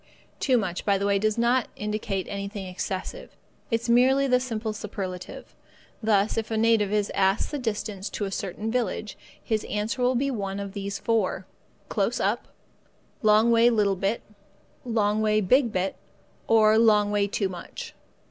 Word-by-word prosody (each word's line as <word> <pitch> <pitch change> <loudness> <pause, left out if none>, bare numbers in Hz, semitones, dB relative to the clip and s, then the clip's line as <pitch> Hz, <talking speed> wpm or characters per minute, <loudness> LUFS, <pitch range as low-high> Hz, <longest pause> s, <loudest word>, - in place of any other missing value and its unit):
Too 260 -3 +3
much, 185 -6 -2
by 200 -1 +2
the 200 - -2
way, 200 -1 +2
does 215 +1 0
not 240 +1 +2
indicate 210 -2 -3
anything 200 0 -5
excessive. 185 +1 -5 0.3
It 230 -1 +1
is - - -6
merely 260 +3 +4
the 250 -2 +3
simple 225 -3 -3
superlative. 195 -4 -7 0.5
Thus, 215 -1 +2
if 220 - -5
a 220 - -1
native 220 -2 +3
is 210 -1 0
asked 195 +1 +1
the 295 - -3
distance 210 -4 -3
to 205 - -3
a 195 - -4
certain 200 +3 -4
village, 220 -3 -2 0.3
his 220 -2 -1
answer 215 +5 -2
will 250 +1 +3
be 275 +3 +1
one 200 -4 -3
of 200 -1 -6
these 200 -1 -4
four: 205 -5 0 0.4
"Close - - 0
up"; - - 0 0.7
"long 215 +2 +5
way 230 +1 +6
little 210 -4 +2
bit"; 195 +4 -1 0.6
"long 215 -3 +1
way 215 0 +3
big 235 +5 +3
bit"; 190 0 -1 0.5
or 220 -1 +5
"long 210 -2 +4
way 205 -1 +2
too 200 0 -1
much." 180 -2 -8
215 Hz, 165 wpm, -26 LUFS, 200-230 Hz, 0.7 s, way